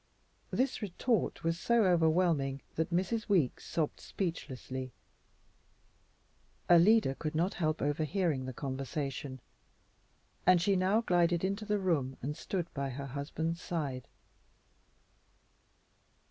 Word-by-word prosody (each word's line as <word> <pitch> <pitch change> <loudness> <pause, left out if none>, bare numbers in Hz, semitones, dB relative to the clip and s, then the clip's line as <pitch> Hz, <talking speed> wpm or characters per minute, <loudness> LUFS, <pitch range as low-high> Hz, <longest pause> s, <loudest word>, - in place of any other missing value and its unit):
This 260 0 0
retort 210 +2 -1
was 165 +1 0
so 235 +2 +3
overwhelming 160 -5 +2
that 160 - -1
Mrs. 190 +6 -1
Weeks 170 -11 +1
sobbed 155 -3 -1
speechlessly. 130 -7 -4 1.7
Alida 175 -1 +6
could 155 +2 -4
not 175 +5 +1
help 155 -2 -1
overhearing 155 -1 0
the - - -3
conversation, 135 0 -4 1.0
and 185 -1 +6
she 195 +3 +2
now 190 +4 +3
glided 175 -4 +2
into 200 +3 -1
the 210 0 +1
room 155 -9 0
and 145 +4 -3
stood 175 +1 -3
by 140 -1 -2
her 140 +2 -5
husband's 150 +5 -3
side. 140 -7 -3
165 Hz, 110 wpm, -32 LUFS, 140-185 Hz, 1.7 s, Alida